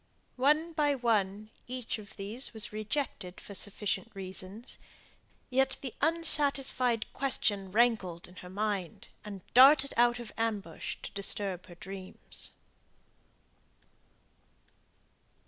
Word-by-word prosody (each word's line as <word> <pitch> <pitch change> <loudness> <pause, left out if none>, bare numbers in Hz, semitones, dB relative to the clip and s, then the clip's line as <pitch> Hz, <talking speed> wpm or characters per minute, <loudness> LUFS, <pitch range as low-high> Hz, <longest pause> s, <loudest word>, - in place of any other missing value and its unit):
One 300 +6 +3
by 295 -2 +2
one, 215 -4 0 0.2
each 250 -3 -3
of 210 0 -12
these 220 +5 -1
was 220 -1 -4
rejected 215 -4 -3
for 200 - -10
sufficient 205 +3 -1
reasons. 190 +4 -7 0.7
Yet 265 +1 +2
the 260 -4 -5
unsatisfied 280 -7 +3
question 205 -8 0
rankled 210 -6 +2
in 180 +1 -17
her 180 - -9
mind, 205 +1 -3
and 200 -3 -7
darted 270 +2 +8
out 240 0 +5
of 240 -2 -8
ambush 210 -7 -2
to - - -6
disturb 195 -2 -1
her 175 - -12
dreams. 190 +1 -5
215 Hz, 110 wpm, -31 LUFS, 195-260 Hz, 0.7 s, darted